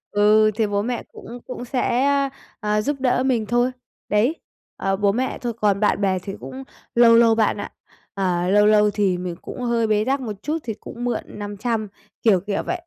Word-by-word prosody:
Ừ, 215 +1 +5
thì 220 -2 +1
bố 200 0 0
mẹ 240 +2 -3
cũng 240 +1 -10
cũng 250 -1 -6
sẽ, 245 0 0
a, 280 -1 +2 0.3
à, 210 -1 0
giúp 290 +5 -1
đỡ 255 0 +1
mình 240 -5 +1
thôi. 240 +3 +1 0.4
Đấy. 230 +10 +2 0.4
Ờ, 195 0 0
bố 200 0 +2
mẹ 255 +4 -2
thôi, 240 -2 -2
còn 200 -2 +2
bạn 210 -1 +1
bè 190 -2 +1
thì 195 +2 -7
cũng 265 +1 -8 0.3
lâu 235 -1 +7
lâu 230 -1 +5
bạn 220 -2 +2
ạ. - - -6 0.4
Ờ, 180 -3 0
lâu 205 +1 +5
lâu 210 0 +5
thì 195 -3 +1
mình 180 -1 -4
cũng - - -8
hơi 235 -2 +1
bế 215 0 +2
tắc 270 +1 0
một 225 -4 -4
chút 310 +2 -1
thì 225 -2 -3
cũng 240 +3 -9
mượn 245 -1 -1
500, 210 +2 -3 0.4
kiểu, 205 -5 +5
kiểu 200 +2 -3
vậy. 355 - -2
215 Hz, 210 wpm, -22 LUFS, 205-245 Hz, 0.4 s, lâu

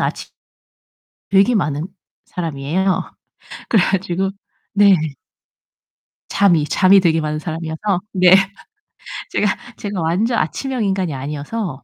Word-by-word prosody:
아침 - - -3 1.0
되게 200 +5 +4
많은 150 -5 -1 0.4
사람이에요. 170 +3 -2 0.6
그래 215 -5 +4
가지고 190 0 -1 0.4
네. 200 -1 +6 1.4
잠이, 175 -7 +3
잠이 190 +5 +5
되게 165 -3 +2
많은 155 0 -2
사람이어서 165 +4 -3
네. 180 -1 +5 1.0
제가, 210 - +1 0.3
제가 200 -3 -4
완전 200 +9 +1
아침형 255 - -2
인간이 190 -5 -1
아니어서 145 +4 -5
180 Hz, 240 characters per minute, -19 LUFS, 160-200 Hz, 1.4 s, 네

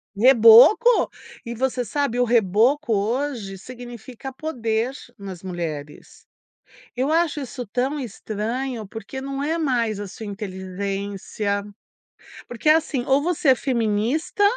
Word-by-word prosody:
Reboco. 250 - +7 0.4
E 235 - -5
você 250 0 -1
sabe, 245 +1 -1
o 245 - +4
reboco 235 +4 +2
hoje 225 -1 -2
significa 245 +3 -9
poder 245 -5 -2 0.3
nas 190 -3 -8
mulheres. 160 -5 -6 0.7
Eu 265 +4 0
acho 325 -2 +1
isso 250 -2 -6
tão 255 +7 -1
estranho 230 0 -4
porque 225 +6 -7
não 275 +1 -4
é 320 +3 0
mais 240 -9 0
a 205 - -5
sua 220 +3 -9
inteligência. 200 +1 -4 0.9
Porque, 245 +5 -2
assim, 310 -5 +2
ou 275 +1 +3
você 325 -3 +2
é - - +7
feminista 245 - -1
240 Hz, 120 wpm, -23 LUFS, 205-270 Hz, 0.9 s, Reboco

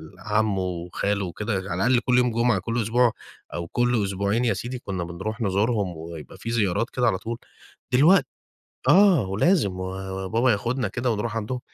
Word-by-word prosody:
لعمو 105 +2 0
وخالو 90 +2 -2
وكده، 105 +6 -3 0.2
على - - 0
الأقل 125 0 +4
كل 125 +1 +1
يوم 125 -1 +3
جمعة، 115 -2 +2
كل 115 +5 -2
أسبوع 120 +2 +3 0.4
أو 85 -1 -4
كل 120 +1 +1
أسبوعين 100 +4 0
يا 115 - +3
سيدي، 125 +1 -5
كنا 95 -6 -4
بنرُوح 95 +7 -5
نزورهم 100 -3 0
ويبقى 80 +1 -9
في 110 - -6
زيارات 110 0 +1
كده 125 -1 0
على 95 - +2
طول. 115 +4 -5 0.6
دلوقت 150 +5 +6 0.6
آه، 185 - +6
ولازم 100 - +2
و 95 - -3 0.4
وبابا 115 +6 +2
ياخُدنا 115 +5 -1
كده 125 0 -1
ونرُوح 110 +1 -2
عندهم. 115 +4 -3
110 Hz, 170 wpm, -24 LUFS, 95-120 Hz, 0.6 s, دلوقت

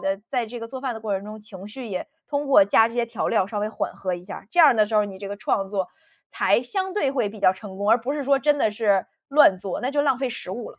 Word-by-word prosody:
的 195 0 -1
在 245 -4 -1
这 240 +2 -8
个 230 - -5
做 260 +2 -7
饭 260 -3 -3
的 220 - -8
过 215 -2 -2
程 195 +1 -4
中 215 +1 -9
情 200 -2 -11
绪 250 +3 -8
也 195 +3 -5 0.2
通 290 0 -2
过 270 -7 +6
加 225 +3 +4
这 230 - -11
些 240 -1 +1
调 230 - -3
料 195 -5 +2
稍 210 +1 -4
微 210 +1 -1
缓 220 - -4
和 185 -1 -3
一 175 0 -9
下。 195 0 -9
这 - - -5
样 295 -6 +7
的 215 -1 +4
时 220 - -5
候 210 -1 +4
你 195 -2 -8
这 200 0 -7
个 200 - -5
创 195 -1 -1
作， 190 -2 -2 0.4
才 - - +2
相 380 +8 -3
对 290 -10 +1
会 250 -6 0
比 215 +1 -11
较 185 - +4
成 190 0 -10
功， 205 +2 0
而 235 - +6
不 250 +5 -3
是 290 -2 -3
说 275 0 +3
真 295 +1 +2
的 220 - +1
是 205 -3 +1 0.2
乱 275 -10 +5
做， 190 -1 -5
那 255 - -1
就 290 0 +1
浪 275 -3 +2
费 265 -1 -2
食 185 - -7
物 225 +4 -6
了。 - - -18
220 Hz, 335 characters per minute, -24 LUFS, 200-265 Hz, 0.4 s, 样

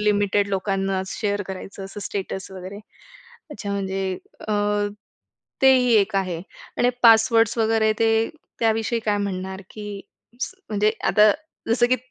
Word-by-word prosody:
Limited 205 -1 +2
लोकांनाच 195 -1 -1
share 205 -1 0
करायचं 195 +1 -7
असं 195 +2 -8
स्टेटस 195 -1 -4
वगैरे. 190 +2 -8 0.7
अच्छा. 215 -8 -6
म्हणजे 190 -1 -2 0.3
अ, - - +1 1.1
तेही 255 -2 +6
एक 200 0 +2
आहे. 185 -4 -1 0.4
आणि 245 - +4
पासवर्ड्स 225 0 +5
वगैरे 220 -1 +3
ते 225 - +3 0.5
त्याविषयी 225 +1 +1
काय 210 -1 +2
म्हणणार? 190 -1 -4
की 205 -2 -7 0.4
स - - -3 0.2
म्हणजे 210 0 +2
आता 210 0 +6 0.4
जसं 240 +1 +4
की 255 - +3
205 Hz, 130 wpm, -23 LUFS, 195-225 Hz, 1.1 s, तेही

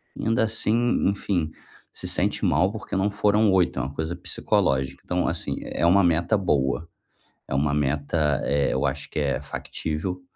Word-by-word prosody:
e - - -4
ainda, 115 +1 +3
assim, 115 +1 +1
enfim, 90 -5 -1 0.4
se - - -7
sente - - 0
mal 95 +2 +3
porque 110 -3 -6
não 95 +2 +2
foram 105 +1 +3
8, 90 -2 +2
é - - 0
uma 70 - -5
coisa 80 +3 -3
psicológica. 65 -6 0
Então, 90 0 0
assim, 80 0 -2
é - - -4
uma 95 +3 +5
meta 85 +4 +2
boa, 75 -4 0 0.6
é - - -5
uma 70 +1 +1
meta 75 +1 0
eh, 70 0 +1
eu 65 - 0
acho 70 +1 -4
que - - -2
é 70 -1 0
factível 80 +5 -4
85 Hz, 175 wpm, -25 LUFS, 70-100 Hz, 0.6 s, uma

